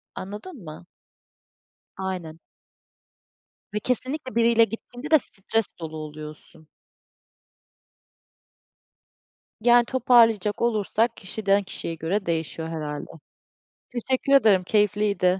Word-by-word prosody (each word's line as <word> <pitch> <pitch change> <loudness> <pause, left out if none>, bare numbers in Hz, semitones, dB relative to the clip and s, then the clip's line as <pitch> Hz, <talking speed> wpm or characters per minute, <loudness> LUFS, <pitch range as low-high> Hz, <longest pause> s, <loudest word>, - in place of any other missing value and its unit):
anladın 210 - -8
mı? 155 +1 -10 1.1
Aynen. 180 -4 -5 1.3
Ve 210 - 0
kesinlikle, 255 +2 -3
biriyle 230 0 +5
gittiğinde 245 +6 -6
de, 315 - +7
stres 220 -1 -2
dolu 160 -1 -6
oluyorsun. 155 0 -9 2.9
Yani 240 +1 +5
toparlayacak 230 -5 +3
olursak, 225 0 +1
kişiden 200 +1 0
kişiye 170 -3 -4
göre 190 +6 -2
değişiyor, 160 -1 -2
herhâlde. 150 -3 -5 0.8
Teşekkür 260 +3 0
ederim, 215 -9 +6
keyifliydi. 205 -1 +1
210 Hz, 85 wpm, -25 LUFS, 170-235 Hz, 2.9 s, de